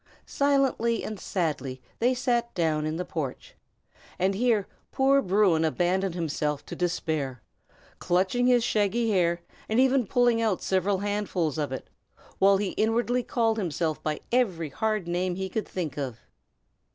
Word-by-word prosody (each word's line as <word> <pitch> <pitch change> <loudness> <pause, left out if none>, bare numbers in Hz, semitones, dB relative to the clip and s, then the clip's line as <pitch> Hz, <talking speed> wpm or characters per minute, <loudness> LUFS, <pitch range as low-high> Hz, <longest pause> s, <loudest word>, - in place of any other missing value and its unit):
Silently 275 -5 +1
and 215 -2 -5
sadly 140 -10 -2 0.2
they 250 +2 +2
sat 240 -2 0
down 155 -3 +1
in 155 - -2
the 180 +2 -3
porch, 150 -8 -5 0.6
and 190 +2 +1
here 220 -1 +2 0.3
poor 275 +1 +4
Bruin 190 -5 +3
abandoned 180 +3 0
himself 150 -3 -2
to - - -7
despair, 155 -8 -2 0.6
clutching 190 +8 +1
his 245 -2 +4
shaggy 225 +1 +1
hair, 170 -3 +2 0.3
and 220 +3 +2
even 260 -3 +3
pulling 240 -1 +3
out 215 -5 0
several 190 +1 +1
handfuls 200 -6 -1
of 145 -3 -2
it, 130 - -5 0.5
while 195 0 +5
he 200 -1 -1
inwardly 235 +4 +1
called 225 -2 0
himself 165 -4 -2
by 155 -1 -2
every 190 -11 +1
hard 215 +4 -1
name 175 +1 -1
he 190 0 -3
could 215 +3 -3
think 160 -6 -4
of. 130 -5 -4
190 Hz, 150 wpm, -27 LUFS, 165-230 Hz, 0.6 s, while